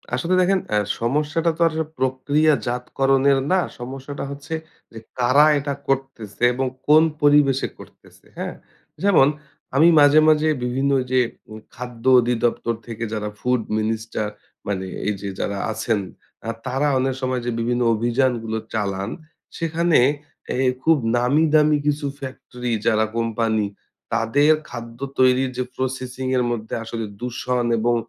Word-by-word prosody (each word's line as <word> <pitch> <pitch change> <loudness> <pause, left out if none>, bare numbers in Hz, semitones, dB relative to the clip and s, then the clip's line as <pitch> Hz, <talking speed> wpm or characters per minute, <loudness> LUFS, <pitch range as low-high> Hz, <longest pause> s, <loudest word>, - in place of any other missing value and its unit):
আসলে 170 +8 -1
দেখেন 190 +1 +3
অ্যা 105 - +2 0.2
সমস্যাটা 150 +7 0
তো 170 - -6
আর 165 - -2 0.3
প্রক্রিয়াজাতকরণের 135 0 +1
না 190 - +4 0.2
সমস্যাটা 135 +3 -6
হচ্ছে 145 +3 -7 0.4
যে 115 - -9 0.2
কারা 130 +4 +5
এটা 140 0 -3
করতেছে 135 -5 -3
এবং 130 +1 -1 0.2
কোন 155 +2 +7 0.2
পরিবেশে 145 -2 +4
করতেছে, - - -17
হ্যাঁ? - - -4 0.5
যেমন 180 -9 +5 0.5
আমি 155 +5 +6
মাঝে, 145 +1 +7
মাঝে 155 0 +3 0.2
বিভিন্ন 130 +3 0 0.2
যে 130 - +4 0.3
উম 110 0 -9 0.2
খাদ্য 120 -1 -8 0.2
অধিদপ্তর 120 -1 0
থেকে 115 0 -5
যারা 105 -1 -3
ফুড 125 -1 +1 0.2
মিনিস্টার 110 0 -2 0.4
মানে 95 -2 -2 0.2
এই 105 - +1
যে 100 - -4
যারা 100 - -2
আছেন। 110 -1 -1 0.5
আ - - -1 0.2
তারা 135 +3 0
অনেক 130 +1 +1
সময় 130 -1 -1
যে 120 - -1
বিভিন্ন 120 +1 0
অভিযানগুলো 120 -1 0 0.2
চালান 100 -2 -2 0.5
সেখানে 165 -1 +2 0.6
এ - - -2 0.3
খুব 160 -1 +4 0.2
নামি 135 +6 +3
দামি 150 -1 +5
কিছু 145 0 0
ফ্যাক্টরি 125 -2 -6
যারা 110 0 +3
কোম্পানি 115 -2 0 0.5
তাদের 145 +7 +3 0.2
খাদ্য 115 0 -8 0.2
তৈরির 130 0 +4
যে 130 - 0
প্রসেসিং 130 0 -4
এর 125 - +2
মধ্যে 110 -2 -5
আসলে 115 0 -4
দূষণ 125 0 -2
এবং 120 +2 +2
125 Hz, 135 wpm, -22 LUFS, 115-145 Hz, 0.6 s, কোন